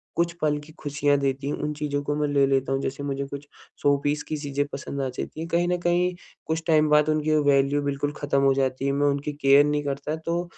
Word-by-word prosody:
कुछ 170 0 +1
पल 150 -1 +2
की 150 +2 -13
खुशियाँ 145 0 +1
देती 135 0 -1
हैं 145 - -1
उन 150 0 -3
चीज़ों 145 -1 -2
को 145 +1 -1
मैं 150 0 0
ले 140 -1 +3
लेता 135 -1 +1
हूँ। 135 - 0
जैसे 135 +2 -4
मुझे 140 -1 -2
कुछ 140 +1 -8 0.3
शो 145 0 +4
पीस 145 +1 0
की 155 - -2
चीजें 145 -1 -2
पसंद 140 0 -4
आ 135 - -1
जाती 130 +4 -6
हैं, 165 - -4
कहीं 175 +1 +1
न 180 0 +1
कहीं 175 +1 +2 0.3
कुछ 160 +1 -2
टाइम 155 -1 +4
बाद 150 +1 +4
उनकी 155 0 +1
वो 150 - +2
वैल्यू 140 0 +3
बिल्कुल 145 +1 -1
ख़त्म 140 -1 0
हो 135 0 +5
जाती 135 0 -1
है 140 - +2
मैं 145 +1 +2
उनकी 145 +1 -1
केयर 140 +1 +6
नहीं 150 0 0
करता 140 +2 -3
तो 170 +1 0
145 Hz, 250 wpm, -25 LUFS, 140-150 Hz, 0.3 s, केयर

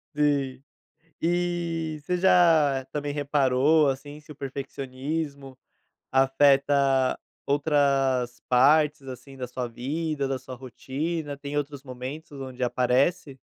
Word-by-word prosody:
Sim. 140 -3 0 0.6
E, 170 -2 -1
você 180 +4 -1
já 160 -7 +4
também 145 -1 -3
reparou, 145 +1 +3
assim, 145 +2 -4
se 150 - -18
o 150 - -10
perfeccionismo 140 +1 -5 0.5
afeta 135 0 +3 0.3
outras 140 -4 +1
partes, 145 +3 +4
assim, 135 +1 -10
da 125 -1 -5
sua 125 0 -4
vida, 140 +5 -3
da 135 0 -1
sua 130 0 -9
rotina, 145 +4 -4
tem 145 +1 -5
outros 145 -1 -3
momentos 135 +4 -8
onde 130 -1 -8
aparece? 135 +5 +1
140 Hz, 110 wpm, -26 LUFS, 130-150 Hz, 0.6 s, já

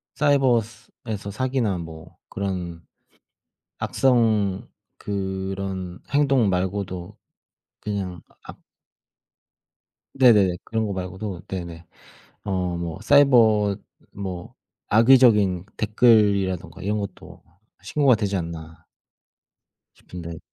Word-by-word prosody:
사이버스 125 -7 +1
에서 100 -3 -5
사기나 125 -4 -1
뭐 80 0 -10
그런 90 -4 -4 1.0
악성 110 -7 +1 0.3
그런 95 -2 -4
행동 135 -6 +3
말고도 95 0 -3 0.6
그냥 95 -5 -4 0.2
악 - - -12 1.6
네네네. 105 -9 +5
그런 110 -1 -2
거 100 - -3
말고도 95 0 -5
네네 85 -3 -6 0.6
어 90 -3 -2
뭐 85 +1 -5
사이버 115 -7 +5 0.4
뭐 95 -3 -7 0.3
악의적인 105 -6 +5
댓글이라든가 100 -6 +2
이런 105 +2 -1
것도 100 - -9 0.4
신고가 140 -4 +3
되지 100 -2 -1
않나 80 -2 -7 1.1
싶은데. 85 -2 -9
100 Hz, 190 characters per minute, -23 LUFS, 90-110 Hz, 1.6 s, 네네네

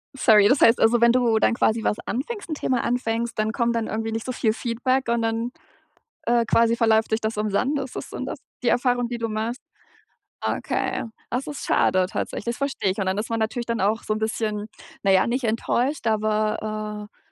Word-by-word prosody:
Sorry. 215 -6 +6
Das 265 +2 +4
heißt, 230 +1 +6
also 230 +1 +4
wenn 235 0 +6
du 240 -2 +3
dann - - +3
quasi 225 -1 +1
was 210 - +1
anfängst 405 - -4
'n 310 - -2
Thema 255 -4 0
anfängst, 235 -1 -1
dann 215 0 +1
kommt 235 0 0
dann 230 -1 -1
irgendwie 225 +1 -3
nicht 225 0 -3
so 255 - -2
viel 230 -3 +1
Feedback 250 +2 -1
und 235 0 +1
dann, 225 +1 -1 0.7
äh, 235 -1 +3
quasi 230 +1 +3
verläuft 225 -1 +2
sich 220 +1 +1
das 220 0 -2
im 210 0 -1
Sand. 270 +8 +1
Ist 265 -2 -6
das - - -6
so - - -7
das - - -5 0.2
die 240 - +3
Erfahrung, 245 -1 +2
die 240 0 -5
du 230 0 -2
machst? 220 +4 -3 0.8
Okay. - - -1 0.3
Das 250 +3 -2
ist 295 - -6
schade 185 0 +3
tatsächlich, - - -4
das 235 0 -2
verstehe 275 -8 -1
ich. 190 - -6
Und 195 - -1
dann 190 +1 0
ist 210 - -3
man 230 0 -1
natürlich 225 +2 -2
dann 230 -1 -2
auch 215 +4 +1
so - - -4
'n 215 - -3
bisschen, 215 -1 -2 0.4
naja, 190 -1 +4
nicht 250 +2 -1
enttäuscht, 240 +5 0
aber, 215 -1 -1
äh, - - -38
230 Hz, 215 wpm, -24 LUFS, 215-245 Hz, 0.8 s, Sorry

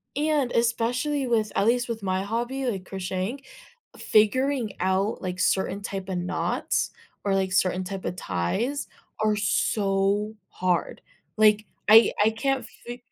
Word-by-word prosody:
And 295 -4 +1
especially 245 +5 0
with, 220 -3 +1
at 200 - +2
least 240 +1 +2
with 225 -3 -4
my 185 0 0
hobby, 240 +6 -2
like 195 -6 -2
crocheting 190 +7 -4 0.6
figuring 245 +2 +2
out, 190 +3 0
like, 180 -1 -4
certain 190 +1 +1
type 195 -1 -5
a 185 - -2
knots 180 +1 -1 0.3
or, 200 -1 +1
like, 190 -1 0
certain 185 0 +2
type 190 0 -6
a - - 0
ties 180 - -2 0.4
are 215 -1 +3
so 205 0 +1
hard, 180 -1 -1 0.4
like, 215 -1 +4 0.2
I 225 +2 +8
I 215 - +5
can't 270 +4 -1 0.2
fi 240 - -5
210 Hz, 140 wpm, -26 LUFS, 190-240 Hz, 0.6 s, I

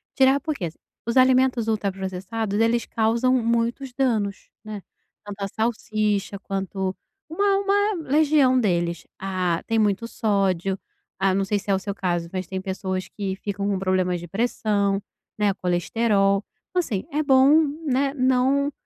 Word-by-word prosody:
Tirar 270 +1 +5
porque 280 - -3 0.4
os 235 - 0
alimentos 255 -2 +4
ultraprocessados, 200 0 -2
eles 230 +1 +2
causam 230 +3 +1
muitos 235 +3 0
danos, 220 -7 -1
né, 215 -2 -7 0.4
tanto 205 -1 -8
a 195 - -1
salsicha 215 -3 -1
quanto 195 -1 -3 0.3
uma 395 +4 +2
uma 405 +1 +2 0.2
legião 290 -3 +4
deles. 170 -6 0
Ah, 185 -3 -1
tem 225 - +1
muito 210 +1 +1
sódio, 195 -4 0 0.4
ah, 195 -1 +2
não 195 +1 +1
sei 205 +1 0
se 200 - -11
é - - +4
o - - -1
seu 200 +1 -4
caso, 175 -3 -1
mas 185 -2 -4
tem 190 -1 -4
pessoas 190 0 -3
que 195 -2 -4
ficam 200 0 -3
com 200 -1 0
problemas 185 -1 +1
de 175 - -8
pressão, 200 -1 0 0.4
né, 205 -1 +2
colesterol. 195 +3 +1 0.3
Então 365 - 0
assim, 225 - -1
é 300 - 0
bom, 275 +3 +6 0.2
né, 275 0 +1
não 265 +2 +2
210 Hz, 150 wpm, -24 LUFS, 195-255 Hz, 0.4 s, bom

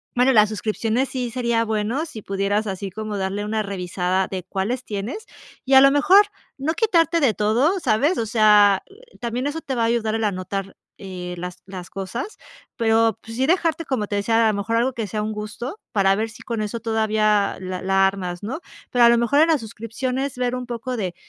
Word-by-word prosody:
bueno, 250 +2 +4
las 210 -2 +5
suscripciones 220 +4 -1
sí 250 -2 -3
sería 235 -1 0
bueno 220 +7 -1
si 265 -10 -9
pudieras 200 +2 -1
así 195 0 -4
como 215 +1 -5
darle 195 +2 -2
una 215 +1 -1
revisada 185 -1 -1
de 185 -2 -5
cuáles 200 +7 -3
tienes 215 - -5 0.4
y 270 0 +3
a 265 - +10
lo 275 - +8
mejor, 370 +9 +6 0.3
no 290 +4 -1
quitarte 340 -5 +2
de 260 -6 +4
todo, 245 - +2
¿sabes? 290 +4 +2
O 230 - 0
sea, 210 -3 +5 0.4
también 245 +3 -2
eso 310 +3 -4
te 270 - -4
va 235 - +1
a - - +3
ayudar 230 -2 0
el 225 0 0
anotar, 195 0 -3 0.2
eh, 180 -2 -7
las 180 0 -7
las 185 -2 -8
cosas, 215 - -5 0.4
pero, 225 -1 +3
pues, 225 0 -9
sí 265 +1 +1
dejarte, 330 -1 +1
como 245 -7 -2
te 205 - -2
decía, 225 +3 +2
a - - +3
lo 205 - -3
mejor 200 +3 -1
algo 245 +3 +2
que 225 -3 -4
sea 210 +1 -3
un 215 - -2
gusto 215 - -6
para 195 -2 +4
ver 220 +2 -2
si 215 - -13
con 230 -2 -3
eso 215 +2 -4
todavía 215 -2 +1
la 185 -1 -5
la 195 0 +3
armas, 180 -2 -4
¿no? 255 +10 -4 0.3
Pero 245 -1 +5
a - - +8
lo 235 - +5
mejor 235 +5 +2
en 320 - +5
las 315 -5 +2
suscripciones 250 +5 -4
ver 250 0 0
un 250 0 -5
poco 245 +1 -4
de, 185 -5 -3
220 Hz, 210 wpm, -22 LUFS, 200-250 Hz, 0.4 s, a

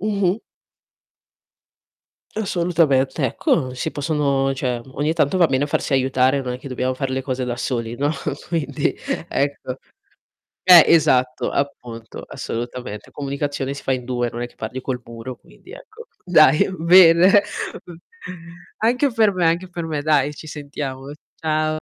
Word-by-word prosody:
Mh-mh. 200 -1 0 2.0
Assolutamente, 165 -9 +1
ecco 130 +2 0
si 130 +5 -3
possono 140 -2 0
cioè, 125 -3 -2
ogni 150 +3 0
tanto 165 +2 +1
va 170 - +5
bene 135 +1 +1
farsi 145 -1 -2
aiutare, 130 +1 +2
non 125 -2 -4
è 125 - -7
che 140 - -9
dobbiamo 130 0 -2
fare 135 0 -3
le 130 - -1
cose 130 -1 -3
da 120 -1 -3
soli, 120 -2 -3
no. 145 +4 0 0.4
Quindi, 145 -5 -1 0.4
ecco. 140 -2 -2 0.9
Eh, 180 -3 +9
esatto, 130 -6 +3
appunto, 120 -5 -5
assolutamente. 120 -2 -6
Comunicazione 140 -1 -3
si 140 - -9
fa - - -1
in 130 -1 -1
2 120 -1 -2
non 120 - -6
è 120 - -3
che - - -24
parli 120 +4 -6
col 125 -1 -3
muro, 115 +2 -8
quindi, - - -19
ecco. 460 +2 -13 0.2
Dai, 155 -5 +5
bene, 180 +3 +6 0.3
okay, 170 -2 -12 0.8
anche 250 +5 +1
per 220 -3 +3
me, 180 -2 0
anche 170 +3 +1
per 175 -2 -5
me, 155 -3 -3
dai, 150 -1 +2
ci 155 - -11
sentiamo. 140 -2 -6 0.2
Ciao. 155 0 -1
140 Hz, 150 wpm, -21 LUFS, 130-165 Hz, 2.0 s, Eh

